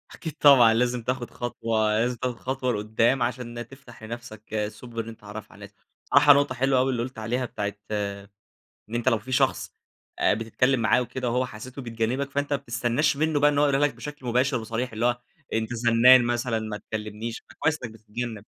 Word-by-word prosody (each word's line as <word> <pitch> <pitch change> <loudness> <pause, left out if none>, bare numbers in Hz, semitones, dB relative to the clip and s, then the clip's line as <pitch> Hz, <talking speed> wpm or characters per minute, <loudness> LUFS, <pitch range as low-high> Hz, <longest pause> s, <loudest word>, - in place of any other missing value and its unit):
أكيد 160 -3 -6
طبعًا، 125 -6 +7
لازم 120 0 0
تاخد 125 0 -2
خطوة، 110 -2 0
لازم 120 +1 +1
تاخد 125 0 -2
خطوة 130 -1 -1
لقدام 110 +4 +1
عشان 120 -1 -4
تفتح 135 -4 -15
لنفسك 110 -2 -5
سُبل 115 +1 -7
إن 115 - -9
أنت 115 - -10
تتعرف 105 +1 -10
على - - -16
الناس. 100 - -17 0.3
بصراحة 145 +1 +7
نقطة 140 -2 +1
حلوة 130 +1 +2
أوي 130 +1 +2
اللي 120 -2 -1
قُلت 130 -2 -7
عليها، 120 +3 -1
بتاعة 105 -3 -4 1.2
إن 120 - -5
أنت 120 +2 +2
لو 115 - +2
في 130 +5 -10
شخص - - +1 0.5
آآ، - - +4
بتتكلّم 115 +4 +1
معاه 115 +2 +3
وكده 125 0 -3
وهو 125 +2 +1
حسيته 125 +4 -9
بيتجنبك 120 +4 -2
فأنت 145 +1 -1
ما - - +2
بتستناش 120 +5 0
منّه 155 -1 +1
بقى 145 +1 +5
إن 145 - -1
هو 145 - +4
يقولها 140 +1 +3
لك - - -8
بشكل 150 -3 -8
مباشر 125 +2 +2
وصريح، 115 +2 -4
اللي 115 +2 -1
هو 120 0 +1 0.3
أنت 110 +2 -1
زنان 120 +2 +6
مثلًا، 120 -1 0
ما 110 -1 -5
تكلمنيش. 110 +2 -6
فكويس 160 -1 -1
إنّك 115 - -5
بتتجنب. 110 0 -6
120 Hz, 195 wpm, -25 LUFS, 110-130 Hz, 1.2 s, طبعًا